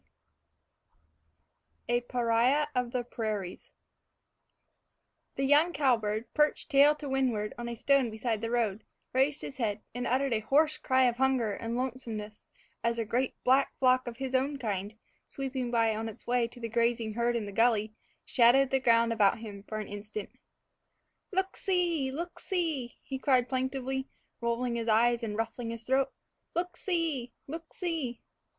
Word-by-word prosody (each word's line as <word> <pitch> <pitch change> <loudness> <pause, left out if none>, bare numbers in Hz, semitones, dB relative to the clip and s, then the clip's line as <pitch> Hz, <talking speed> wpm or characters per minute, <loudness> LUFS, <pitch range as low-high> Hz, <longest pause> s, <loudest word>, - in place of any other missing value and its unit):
IV 240 - +2
A 240 - +2
PARIAH 245 +5 +2
OF 250 -1 -1
THE 250 -1 -1
PRAIRIES 215 -6 -4 1.7
THE 270 - -1
young 300 +5 +4
cowbird, 230 -6 +1
perched 300 +1 +1
tail 285 +2 +6
to 295 -1 -7
windward 250 -6 0
on 240 0 -5
a 235 - -4
stone 270 +1 +3
beside 220 0 -2
the 230 - -2
road, 225 -4 0 0.3
raised 270 +3 +2
his 265 - -7
head, 215 -4 -1
and 245 +1 -3
uttered 265 +1 +1
a 220 - +2
hoarse 295 +8 +2
cry 260 0 +3
of 240 -2 +2
hunger 260 -5 +2
and 230 +3 -3
lonesomeness 230 -5 -5 0.4
as 235 0 +1
a 230 - -1
great 245 +4 0
black 265 +2 +3
flock 255 -1 +3
of 235 -1 -5
his 265 -1 -4
own 275 +2 +1
kind, 210 -3 -3 0.3
sweeping 265 -2 -3
by 230 -2 +2
on 225 +1 -3
its 215 - -12
way 240 -1 +2
to 245 - -14
the 230 - -3
grazing 230 -1 0
herd 235 +1 +1
in 225 -3 -1
the 200 - -6
gully, 220 -1 +2 0.3
shadowed 255 +2 +5
the 265 - +3
ground 230 -2 +4
about 205 -3 +3
him 210 -3 -8
for 215 - -4
an 215 - -3
instant. 205 0 -6 1.0
"Look 380 0 -1
see! 345 -7 +1
look 340 +5 -5
see!" 320 - -2
he 265 -1 -5
called 255 -2 +3
plaintively, 265 0 -2 0.3
rolling 235 +1 -1
his 230 0 -3
eyes 235 +2 +4
and 215 -2 -3
ruffling 230 +1 -3
his 230 0 -6
throat; 265 +2 +1 0.4
"look 350 +1 -1
see! 320 -11 -1
look 320 +3 -8
see!" 320 -9 -3
245 Hz, 165 wpm, -30 LUFS, 225-270 Hz, 1.7 s, tail